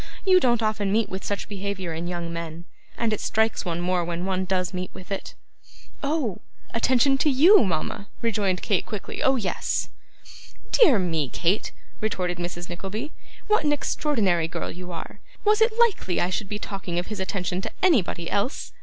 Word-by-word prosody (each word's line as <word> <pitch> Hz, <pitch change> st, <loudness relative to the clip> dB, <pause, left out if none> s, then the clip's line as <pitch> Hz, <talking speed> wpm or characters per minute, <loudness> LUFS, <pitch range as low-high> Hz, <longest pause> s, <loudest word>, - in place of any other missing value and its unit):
You 375 Hz, -1 st, +7 dB
don't 240 Hz, -6 st, +2 dB
often 210 Hz, -2 st, 0 dB
meet 220 Hz, +1 st, +2 dB
with 190 Hz, 0 st, -5 dB
such 205 Hz, -, -3 dB
behaviour 195 Hz, -3 st, -4 dB
in 165 Hz, +2 st, -4 dB
young 170 Hz, -1 st, -4 dB
men, 165 Hz, 0 st, -6 dB, 0.3 s
and 230 Hz, -2 st, +1 dB
it 215 Hz, -, -2 dB
strikes 220 Hz, -1 st, +1 dB
one 170 Hz, -1 st, -2 dB
more 180 Hz, 0 st, +1 dB
when 170 Hz, +1 st, -3 dB
one 190 Hz, -1 st, 0 dB
does 185 Hz, -1 st, 0 dB
meet 185 Hz, 0 st, -3 dB
with 185 Hz, +2 st, -11 dB
it.' 195 Hz, -, -4 dB, 0.7 s
'Oh! 280 Hz, -, -1 dB, 0.3 s
attention 260 Hz, +3 st, +3 dB
to 300 Hz, -, +3 dB
YOU, 305 Hz, -, +7 dB
mama,' 185 Hz, +2 st, -2 dB, 0.2 s
rejoined 200 Hz, -5 st, 0 dB
Kate 200 Hz, -5 st, +2 dB
quickly 210 Hz, -3 st, -6 dB
'oh 265 Hz, -, +4 dB
yes.' 210 Hz, -7 st, -1 dB, 0.8 s
'Dear 310 Hz, -, +6 dB
me, 165 Hz, -7 st, 0 dB
Kate,' 180 Hz, +10 st, 0 dB, 0.3 s
retorted 180 Hz, -5 st, -1 dB
Mrs. 175 Hz, 0 st, -4 dB
Nickleby, 200 Hz, -, -5 dB, 0.3 s
'what 425 Hz, -6 st, +3 dB
an 295 Hz, -, +2 dB
extraordinary 215 Hz, -, +1 dB
girl 170 Hz, 0 st, -4 dB
you 180 Hz, +1 st, -8 dB
are! 165 Hz, -, -7 dB, 0.3 s
Was 425 Hz, +1 st, +4 dB
it 445 Hz, 0 st, +4 dB
likely 440 Hz, -, +2 dB
I 180 Hz, -, +1 dB
should 195 Hz, +2 st, -2 dB
be 210 Hz, -, -2 dB
talking 195 Hz, -4 st, -5 dB
of 175 Hz, -, 0 dB
his 215 Hz, -2 st, -6 dB
attention 185 Hz, -1 st, -2 dB
to -, -, -5 dB
anybody 210 Hz, -, +3 dB
else? 205 Hz, -, -1 dB
195 Hz, 180 wpm, -25 LUFS, 175-235 Hz, 0.8 s, You